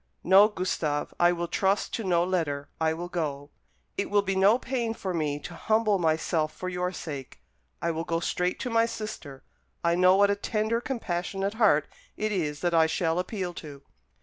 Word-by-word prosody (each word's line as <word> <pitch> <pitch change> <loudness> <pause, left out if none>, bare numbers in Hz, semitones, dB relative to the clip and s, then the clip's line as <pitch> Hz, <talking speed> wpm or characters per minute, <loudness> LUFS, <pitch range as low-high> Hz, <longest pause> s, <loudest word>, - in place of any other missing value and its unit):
"No, 195 +3 +7
Gustave, 170 -7 -2
I 175 0 +5
will 175 0 -2
trust 195 +3 0
to 225 - -2
no 175 -3 +2
letter; 160 -6 -1
I 160 -1 +2
will 170 +2 -4
go. 145 -5 -4 0.5
It 200 - -1
will 205 0 +3
be 195 -1 -1
no 195 +4 +5
pain 240 -3 -2
for 190 -4 -4
me 150 -3 -1
to - - -8
humble 215 -2 +1
myself 160 -1 +1
for 185 - -4
your 180 0 -2
sake. 145 -7 -7 0.4
I 170 - +1
will 165 0 -3
go 165 0 -1
straight 180 +1 -1
to 250 - -3
my 230 0 +3
sister. 215 -12 -7 0.4
I 170 0 +3
know 185 +1 +5
what 200 +1 +4
a - - +1
tender 220 +3 -1
compassionate 195 -5 -3
heart 205 -10 +3 0.3
it 215 0 -1
is 150 -7 -2
that 175 -1 0
I 160 -1 +5
shall 165 +1 0
appeal 185 -1 -3
to." 140 -3 -11
180 Hz, 190 wpm, -27 LUFS, 160-205 Hz, 0.5 s, No